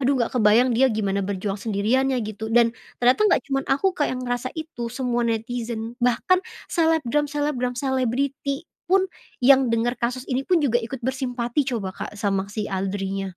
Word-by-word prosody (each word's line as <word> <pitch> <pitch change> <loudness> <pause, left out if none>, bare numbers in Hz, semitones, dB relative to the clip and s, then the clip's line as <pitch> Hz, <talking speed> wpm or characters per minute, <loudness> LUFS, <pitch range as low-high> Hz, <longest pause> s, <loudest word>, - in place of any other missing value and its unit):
aduh 275 +1 +2
enggak 235 - 0
kebayang 225 +3 +5
dia 260 +4 +5
gimana 200 -3 0
berjuang 195 +1 -3
sendirian 225 +6 +1
ya 260 -1 +1
gitu. 215 +1 -5
Dan, 230 0 +4 0.2
ternyata 250 +6 +3
nggak - - +3
cuman 270 0 +1
aku 360 +8 +2
Kak 300 -4 0
yang 255 - -3
ngerasa 245 +1 -2
itu, 315 -7 -5
semua 245 0 -1
netizen 230 0 -3
bahkan 250 +10 +3 0.3
selebgram 305 -4 +2
selebgram, 290 -4 -1
selebriti 270 +3 -1 0.2
pun 380 +1 +4 0.4
yang 265 -1 +6
denger 230 +1 +1
kasus 250 +2 -1
ini 260 -1 -1
pun, 325 +2 +2
juga 240 -3 +2
ikut 235 +1 -6
bersimpati 260 0 -1
coba 205 -7 -2
Kak 210 - -7
sama 200 -2 -1
si 210 +1 -3
Audrey-nya. 195 0 -2
245 Hz, 170 wpm, -24 LUFS, 220-270 Hz, 0.4 s, yang